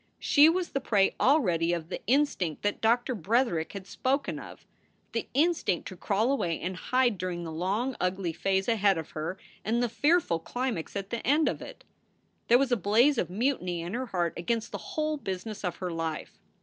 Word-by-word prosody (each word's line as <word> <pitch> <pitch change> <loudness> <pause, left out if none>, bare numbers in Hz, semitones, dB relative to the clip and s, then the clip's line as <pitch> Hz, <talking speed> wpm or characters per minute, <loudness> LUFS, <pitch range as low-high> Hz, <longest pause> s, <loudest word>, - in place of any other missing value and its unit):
She 295 +2 +6
was 355 +1 0
the 275 - -1
prey 205 -6 +2
already 175 - +3
of 165 -1 -4
the - - -5
instinct 240 - +1
that 205 0 -1
Doctor 240 +3 +2
Bretherick 205 -3 0
had 195 -2 -7
spoken 275 +7 -1
of, - - -11 0.5
the - - -2
instinct 300 - +1
to 190 - -9
crawl 215 +7 +1
away 175 -12 0
and 185 +2 -3
hide 245 0 +1
during 175 -1 -3
the 165 - -5
long, 200 +10 -1
ugly 180 -2 -1
phase 190 +3 0
ahead 205 -5 +3
of 160 -1 -6
her 160 +4 -4 0.3
and 235 +3 +1
the - - +2
fearful 290 - +2
climax 240 -1 -3
at 195 -1 -4
the 235 - -1
end 295 +6 +2
of - - -2
it. - - -10 0.6
There 240 - +7
was 265 0 +1
a 245 - +4
blaze 230 +7 +3
of 170 - -1
mutiny 185 -5 -1
in 170 +3 -5
her 255 +2 -2
heart 175 -5 -1
against 225 +6 -2
the - - -5 0.2
whole 310 0 0
business 205 -2 -5
of 180 - -2
her 180 -2 -4
life. 165 -2 -4
205 Hz, 195 wpm, -28 LUFS, 175-255 Hz, 0.6 s, There